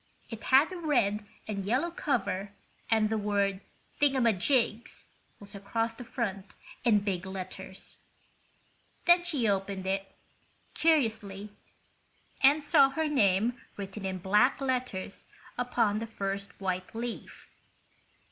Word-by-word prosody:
It 225 0 -7
had 275 +6 +5
a - - -5
red 225 -11 +1 0.2
and 200 -2 -3
yellow 255 - 0
cover 200 - -1 0.4
and 220 -1 +3
the 220 - +1
word 200 -1 0 0.4
"Thingamajigs" 240 -3 +2 0.3
was 205 - -12
across 225 +3 -2
the 245 - -9
front 205 -5 -4 0.3
in 220 -4 +4
big 190 -3 -2
letters. 190 0 -8 1.1
Then 345 0 +6
she 295 -10 0
opened 195 -1 -1
it, 195 +1 -2 0.6
curiously, 220 -10 +1 0.9
and 290 +2 +6
saw 285 -3 +6
her 315 +3 -1
name 230 -3 +2 0.2
written 200 0 -6
in 190 -1 -2
black 210 +8 +3
letters 255 -8 -3 0.3
upon 230 -4 +1
the 230 - -4
first 200 -2 -4
white 185 +1 -3
leaf. 235 +1 -6
215 Hz, 120 wpm, -30 LUFS, 195-255 Hz, 1.1 s, Then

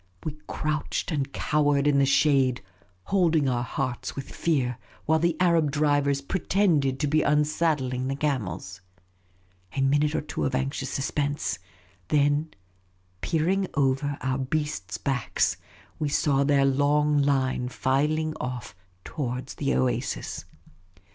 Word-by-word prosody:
We 155 -2 -4
crouched 155 +3 -2
and 140 -3 -1
cowered 145 -2 +1
in 145 -1 +4
the 135 - +3
shade, 135 -4 +3 0.4
holding 165 -7 +2
our 125 -2 +1
hearts 125 0 -3
with 135 - -6
fear, 130 -7 0 0.3
while 160 +1 +3
the 170 0 +1
Arab 170 -4 +3
drivers 145 -1 +1
pretended 155 -5 +1
to 150 - +1
be 155 +2 +3
unsaddling 150 -4 +1
the 135 - -1
camels. 100 - -3 1.0
A - - +2
minute 145 +3 +2
or - - +1
two 150 +1 -4
of 130 - 0
anxious 135 0 -2
suspense; 145 -1 -2 0.5
then, 145 +1 +2 0.7
peer 160 -1 0
ing 195 +1 +1
over 140 0 +1
our 130 0 -1
beasts' 135 -7 -2
backs, 135 -5 0 0.4
we 150 - 0
saw 140 -1 +2
their 140 -1 +3
long 145 +2 +3
line 130 -3 +1
filing 150 +5 0
off 125 -6 -5 0.3
towards 130 -3 -4
the 140 -1 -1
oasis. 130 -1 -1
145 Hz, 130 wpm, -26 LUFS, 130-150 Hz, 1.0 s, in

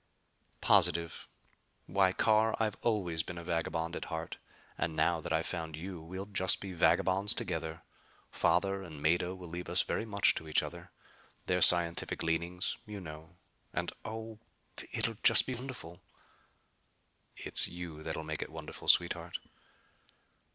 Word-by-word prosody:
"Positive. 85 -4 +2 0.6
Why 95 -2 +2
Carr, 110 +3 +3
I've 110 -2 0
always 95 -8 0
been 85 +2 -7
a 85 - -7
vagabond 85 0 -2
at - - -4
heart. 80 -1 -5 0.4
And 80 +1 -2
now 80 +1 +1
that - - -6
I've 80 +1 +1
found 80 -3 -4
you 90 0 -7
we'll 95 +4 -7
just 95 -2 +2
be 95 -2 -7
vagabonds 95 +3 +3
together. 80 -2 -3 0.5
Father 95 +2 +1
and 80 -6 -9
Mado 85 +3 +1
will 90 -1 -10
leave 85 +2 -6
us - - +4
very - - -2
much 100 -2 +3
to 80 - -6
each 75 - +2
other. - - -8 0.6
Their 90 0 +1
scientific 85 -1 +4
leanings, 85 +2 -1
you 105 -1 -7
know. 80 0 -10 0.4
And - - -1
oh 110 0 -7 0.5
it'll - - +1
just - - +7
be 130 - -3
wonderful!" 120 -9 -8 1.4
"It's - - +4
you 85 -3 -8
that'll 80 0 -4
make 80 -1 -3
it - - -4
wonderful, 80 -1 -9
sweetheart." - - +3
85 Hz, 145 wpm, -32 LUFS, 80-95 Hz, 1.4 s, just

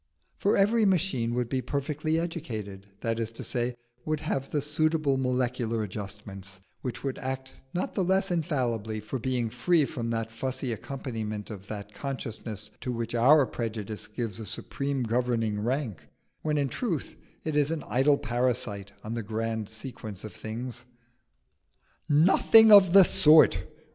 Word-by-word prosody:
For 200 - +2
every 215 +3 +4
machine 170 - +1
would 125 -1 0
be 130 +1 -1
perfectly 150 +4 -1
educated, 110 - -5
that 115 0 -1
is 115 -1 -2
to - - -6
say, 120 -1 -1 0.3
would 155 -1 -2
have 135 -3 -2
the 150 - 0
suitable 150 0 +1
molecular 125 -3 0
adjustments, 100 -1 -7 0.2
which 125 - -5
would 135 -2 -3
act 130 0 -4 0.2
not 175 - -2
the 190 - 0
less 190 +1 +1
infallibly 120 -10 -1
for 110 +5 -5
being 120 -2 -1
free 170 +1 +3
from 120 -5 -4
the 115 -1 -1
fussy 130 +2 -3
accompaniment 110 -4 -5
of 100 -1 -9
that 105 -1 -7
consciousness 115 -6 -5
to 125 - -3
which 115 -1 -3
our 135 +5 +6
prejudice 110 -3 -5
gives 115 -4 -4
a 110 - -6
supreme 140 -2 -3
governing 115 -2 0
rank, 120 - -2 0.3
when 150 -1 0
in 140 -1 +1
truth 170 - -3 0.3
it 155 -2 -2
is 145 -1 +3
an 160 -2 -2
idle 140 +3 +3
parasite 120 -6 -1
on 110 - -4
the 115 - -2
grand 110 0 -3
sequence 110 -3 -7
of 110 - -7
things." 120 +2 -6 1.3
"Nothing 195 +8 +7
of 195 -4 +9
the 195 -1 +10
sort!" 155 -2 +6
125 Hz, 155 wpm, -28 LUFS, 110-150 Hz, 1.3 s, the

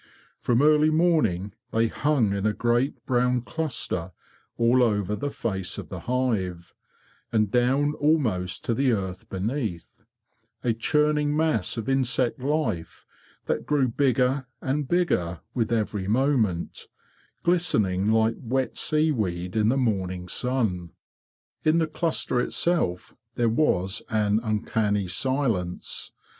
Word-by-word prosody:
From 120 +3 +2
early 150 0 +5
morning 155 - +2 0.2
they 115 +1 +2
hung 130 -5 +1
in 100 +1 0
a 105 - +1
great 120 +3 0
brown 125 -1 +2
cluster 125 - -3 0.4
all 120 +2 +4
over 105 -4 +1
the 145 +5 -3
face 95 -8 -3
of - - -7
the - - -6
hive, 105 -9 -2 0.6
and 110 -3 +1
down 135 +4 +2
almost 115 - +1
to 115 - +1
the 130 +1 +2
earth 95 -3 -4
beneath; 105 - -4 0.6
a 120 - +2
churning 150 +4 +1
mass 155 - 0
of 115 - -4
insect 130 -2 +1
life 125 - -2 0.4
that - - -2
grew 145 -3 +2
bigger 130 +1 +1
and 140 +1 -1
bigger 95 - 0
with 115 -2 -1
every 105 -4 -1
moment, 110 -7 0 0.6
glistening 110 - +2
like 110 0 +2
wet 130 +2 -2
seaweed 105 - 0
in 110 0 +3
the 135 - +2
morning 95 -7 -1
stn. 100 -4 -1 0.7
In 155 +1 +3
the 165 - +3
cluster 155 -5 -1
itself 125 - 0 0.2
there 120 -1 +2
was 95 -7 +1
an 105 -2 +2
uncanny 105 -2 0
silence. 110 -4 -2
120 Hz, 125 wpm, -25 LUFS, 100-140 Hz, 0.7 s, early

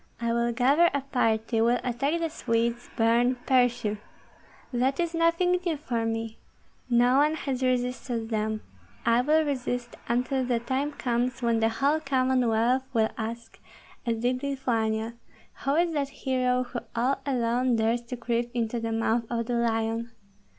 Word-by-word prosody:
"I 235 0 0
will 235 0 +1
gather 275 +8 +4
a 280 - +1
party, 225 -4 0
will 235 +2 +3
attack 275 +7 0
the 330 -1 -2
Swedes, 235 -4 -1
burn, 235 +2 +3
pursue. 245 -5 +2 0.7
That 260 +4 +1
is 340 -1 0
nothing 335 +2 +2
new 335 -4 -1
for 235 -6 -2
me! 225 0 -3 0.5
No 245 +2 +4
one 300 +2 +3
has 270 -4 -3
resisted 250 -2 -1
them; 215 -1 -1 0.4
I 235 +1 +4
will 310 +4 +3
resist 245 -3 -3
until 250 +2 +1
the 245 -2 0
time 270 +5 -2
comes 245 -1 -1
when 230 -1 +2
the 225 0 +3
whole 280 +7 +1
Commonwealth 255 -3 +2
will 220 -2 +3
ask, 230 +1 -6 0.4
as 235 -2 -1
did 250 +2 0
Lithuania, 230 -5 -1 0.5
who 275 +1 +2
is 340 0 +2
that 280 -2 -1
hero 255 -2 0
who 245 -1 -5 0.2
all 250 +4 +1
alone 250 -2 +1
dares 225 +2 +1
to 250 +1 -6
creep 235 0 -1
into 235 0 -1
the 225 0 -3
mouth 225 +1 +1
of 230 -1 -1
the 245 - -3
lion? 230 0 0
245 Hz, 155 wpm, -27 LUFS, 230-265 Hz, 0.7 s, gather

